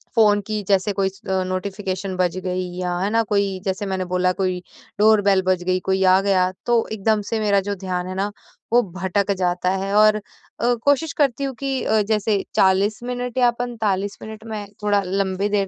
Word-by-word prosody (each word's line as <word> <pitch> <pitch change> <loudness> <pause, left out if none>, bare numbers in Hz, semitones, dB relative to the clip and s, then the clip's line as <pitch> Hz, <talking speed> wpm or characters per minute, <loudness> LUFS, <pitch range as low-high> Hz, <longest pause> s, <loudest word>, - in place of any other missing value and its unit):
Phone 210 -3 +5
की 215 -1 -2
जैसे 200 +1 +2
कोई 195 0 +1
इ 190 - -3 0.4
नोटिफ़िकेशन 190 0 -3
बज 180 0 0
गई 185 0 -2
या 180 -1 -2
है 195 +2 0
ना, 230 +1 +2
कोई 200 -2 0
जैसे 195 +2 -2
मैंने 190 -1 -2
बोला 180 0 +1
कोई 185 -1 -1 0.4
डोर 215 0 +5
बेल 195 -1 +3
बज 185 -1 +2
गई 185 0 +1
कोई 190 0 +1
आ 185 0 +6
गया 190 -2 +2 0.2
तो 235 -1 +2
एकदम 215 0 +1
से 225 - -1
मेरा 205 -2 +3
जो 205 - -1
ध्यान 180 -2 -3
है 185 - -5
न 200 - +1 0.5
वो 245 - +6
भटक 190 +2 -1
जाता 180 0 0
है। 195 +1 -1
और 215 0 +6
अ, 235 +3 -3
कोशिश 285 +2 +2
करती 280 -4 +1
हूँ 270 -1 -2
कि 270 -1 -2
अ, 220 0 +2
जैसे 210 -1 0
40 195 +3 +3
मिनट 245 0 -4
या 245 -1 +5
45 210 -5 -2
मिनट 220 0 -9
में 215 -2 -5 0.2
थोड़ा 205 -1 +2
लंबी 195 +1 -1
देर 200 -2 +1
200 Hz, 200 wpm, -22 LUFS, 185-215 Hz, 0.5 s, आ